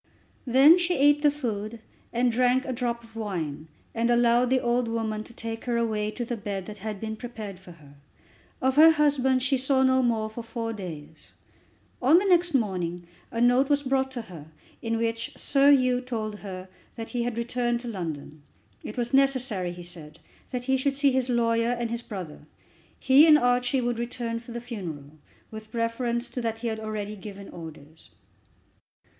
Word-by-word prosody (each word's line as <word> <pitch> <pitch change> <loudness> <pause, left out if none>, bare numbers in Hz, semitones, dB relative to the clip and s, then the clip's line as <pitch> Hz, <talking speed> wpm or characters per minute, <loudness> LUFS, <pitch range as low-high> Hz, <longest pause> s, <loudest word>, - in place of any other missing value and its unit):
Then 275 +8 +7
she 355 0 +1
eat 290 +1 +5
the 295 - +5
food, 230 -6 -4 0.3
and 240 +1 +2
drank 250 +2 +2
a 260 - -3
drop 235 -1 -2
of 225 0 -17
wine, 165 -9 -4 0.3
and 230 +1 0
allowed 240 +1 +4
the 260 0 +3
old 240 0 0
woman 220 -2 -2
to - - -13
take 225 -1 -6
her 240 -1 0
away 215 -2 0
to 240 +3 -4
the 240 - -3
bed 200 -3 -5
that 210 -1 -9
had 210 0 -5
been 220 +1 -4
prepared 215 -5 -8
for 180 -2 -13
her. 145 -4 -17 0.7
Of 260 +1 +2
her 320 +2 +9
husband 280 -4 +2
she 270 +1 +2
saw 265 +1 +2
no 260 0 +4
more 225 -3 +1
for 220 +2 -7
four 230 0 -4
days. 160 -6 -9 0.7
On 275 +6 +6
the 385 - +2
next 350 -4 +3
morning 180 -7 -1 0.3
a 230 - -4
note 245 +3 +4
was 285 0 +2
brought 265 0 +1
to 240 -3 -4
her, 165 -8 -11 0.3
in 225 0 -1
which 230 +4 -2
Sir 275 0 +3
Hugh 255 -2 +3
told 220 -4 -4
her 185 -2 -7 0.3
that 225 -1 -7
he 245 - -1
had 235 -1 -2
returned 240 0 -1
to 245 - -8
London. 160 -7 -6 0.4
It 215 - -7
was 240 +1 -2
necessary, 260 -9 +2
he 175 0 -9
said, 160 -3 -10 0.3
that 250 -1 -4
he 265 +1 +2
should 275 +1 0
see 280 0 +3
his 260 -1 0
lawyer 230 0 +2
and 235 -1 -2
his 235 0 -2
brother. 185 -10 -8 0.5
He 275 +4 +6
and 305 -1 +8
Archie 245 0 +2
would 240 -1 -1
return 235 -1 -3
for 235 +1 -12
the 235 0 -5
funeral. 175 - -7 0.4
With 220 +1 -10
reference 235 +1 -1
to 250 - -4
that 225 -1 -2
he 230 +1 -3
had 220 -1 -4
already 215 -1 -4
given 200 0 -9
orders. 160 -2 -12
235 Hz, 190 wpm, -26 LUFS, 210-255 Hz, 0.7 s, her